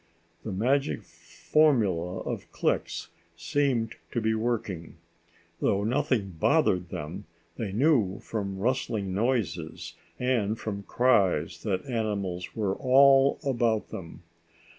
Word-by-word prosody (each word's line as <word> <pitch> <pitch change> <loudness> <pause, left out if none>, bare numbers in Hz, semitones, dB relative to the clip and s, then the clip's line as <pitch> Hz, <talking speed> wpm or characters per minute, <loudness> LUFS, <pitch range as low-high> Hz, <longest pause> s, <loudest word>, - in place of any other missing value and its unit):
The 110 - -4
magic 110 - 0
formula 105 - +1
of - - -5
clicks - - -1 0.3
seemed 130 -6 0
to - - -1
be 110 0 +1
working. 110 -7 -2 0.6
Though 100 +1 +1
nothing 115 - 0
bothered 90 - +2
them, 75 0 -6 0.3
they 110 -5 -3
knew 110 -5 +2
from 100 -3 -4
rustling 110 -3 -1
noises 115 - -2 0.3
and 115 -4 0
from 100 -3 -4
cries 120 -7 +2
that 95 -3 -2
animals 100 -7 -3
were 105 -4 0
all 135 +1 +5
about 120 -5 +1
them. 85 -1 -9
110 Hz, 110 wpm, -28 LUFS, 95-130 Hz, 0.6 s, all